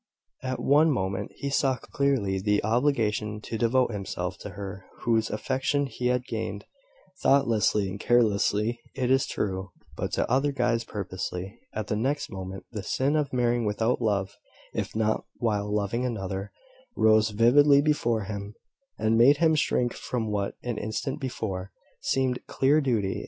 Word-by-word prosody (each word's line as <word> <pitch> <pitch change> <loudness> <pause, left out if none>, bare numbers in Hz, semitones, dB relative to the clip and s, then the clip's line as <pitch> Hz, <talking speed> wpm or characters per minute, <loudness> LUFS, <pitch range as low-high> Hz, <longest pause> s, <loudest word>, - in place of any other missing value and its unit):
At 130 0 -3
one 150 +3 +4
moment 100 -6 -1
he 140 - -4
saw 135 -1 +2
clearly 125 -11 0
the 105 +1 +1
obligation 110 -3 +1
to 115 - -6
devote 120 +2 +2
himself 95 -3 -4
to - - -7
her 100 -1 -6 0.2
whose 115 -1 +1
affections 135 +4 -1
he 125 - 0
had 125 0 +1
gained, - - -4 0.6
thoughtlessly 115 -7 +3
and 95 +2 -6
carelessly, 110 0 +2 0.2
it 130 -1 0
is 135 0 +3
true, 95 -1 -2 0.3
but - - -3
to - - +1
other 135 +4 +2
eyes 115 -1 +1
purposely. 95 -1 -5
At 110 0 -3
the 105 - -2
next 135 +6 -1
moment, 95 -1 -7
the 110 -3 -4
sin 135 +9 0
of 150 -2 0
marrying 120 -1 +1
without 110 +4 0
love, 100 -4 0 0.4
if - - -3
not 110 0 0
while 105 -3 -1
loving 105 +3 0
another, 100 -5 -3 0.5
rose 110 0 +5
vividly 135 +7 +5
before 120 -7 +1
him, 100 +1 -6 0.4
and 110 +1 +2
made 140 +5 +7
him 160 0 +4
shrink 125 -5 +1
from 115 -4 -3
what, 100 -1 -1
an 120 -3 -3
instant 130 +7 -3
before, 100 -7 -4 0.3
seemed 130 -2 0
clear 145 +4 +3
duty. 110 -8 0
115 Hz, 155 wpm, -27 LUFS, 105-130 Hz, 0.6 s, made